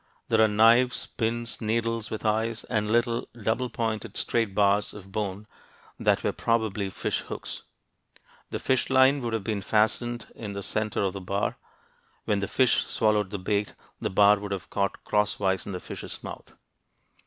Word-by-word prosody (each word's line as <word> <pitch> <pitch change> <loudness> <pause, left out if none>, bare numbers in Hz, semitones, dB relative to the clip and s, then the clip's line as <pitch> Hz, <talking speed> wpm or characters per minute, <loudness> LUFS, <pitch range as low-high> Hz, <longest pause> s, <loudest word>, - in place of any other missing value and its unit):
There 110 -1 +4
are 110 - +7
knives, 115 +4 +4
pins, 115 0 -3
needles 115 0 -1
with 110 - -5
eyes, 110 +1 0
and 105 -3 -1
little 120 +1 +1
double 115 +4 0
pointed 115 -2 -3
straight 115 -4 0
bars 100 0 +3
of 95 -2 -11
bone 100 0 -3 0.5
that - - +2
were - - +1
probably 110 -4 0
fish - - -2
hooks. - - -7 0.9
The - - -3
fish 130 -1 +1
line 135 +1 +5
would 120 -2 -3
have 110 -3 -1
been 105 -1 -2
fastened 110 +3 +1
in 105 -3 -6
the 100 0 -5
center 105 +1 -1
of 95 -2 0
the 100 - -6
bar; 100 +2 -2 0.7
when 105 -1 +1
the 100 - -2
fish 130 +3 +2
swallowed 105 -3 +2
the 100 - -4
bait, 100 +2 -1 0.2
the - - -1
bar 100 +1 +5
would 100 0 -6
have 95 -2 -5
caught 100 -1 -1
cross 105 0 +1
wise 95 -1 0
in - - -4
the 90 - -4
fish's - - -8
mouth. - - -9
110 Hz, 175 wpm, -27 LUFS, 100-115 Hz, 0.9 s, are